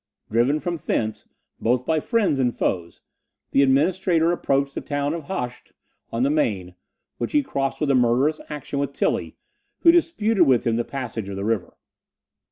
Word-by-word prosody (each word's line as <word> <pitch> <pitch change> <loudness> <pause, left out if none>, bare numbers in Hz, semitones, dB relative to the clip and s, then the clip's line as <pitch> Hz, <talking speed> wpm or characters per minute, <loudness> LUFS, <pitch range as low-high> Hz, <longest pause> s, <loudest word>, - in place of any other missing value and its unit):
Driven 120 +7 +2
from 175 +1 -3
thence, 110 -7 -2 0.3
both 125 +2 +1
by 160 -1 +2
friends 205 - +1
and 125 -2 0
foes, 85 -2 -2 0.5
the 140 - +4
Administrator 165 +5 +3
approached 140 -5 0
the - - -4
town 145 0 -2
of 165 -3 -5
Hoechst 125 -9 -5 0.4
on 115 +2 0
the 140 - +2
Maine, 100 - 0 0.5
which - - -3
he 295 -1 +4
crossed 140 - -2
after 140 - +2
a - - +3
murderous 130 +5 +2
action 145 -1 -4
with 140 0 -2
Tilly, - - -1 0.5
who 335 - +8
disputed 225 - +3
with 125 -3 +3
him 115 -1 +2
the 120 - +1
passage 115 -6 -5
of 100 - -5
the 100 +1 -4
river. 110 -4 -2
140 Hz, 175 wpm, -23 LUFS, 120-160 Hz, 0.5 s, who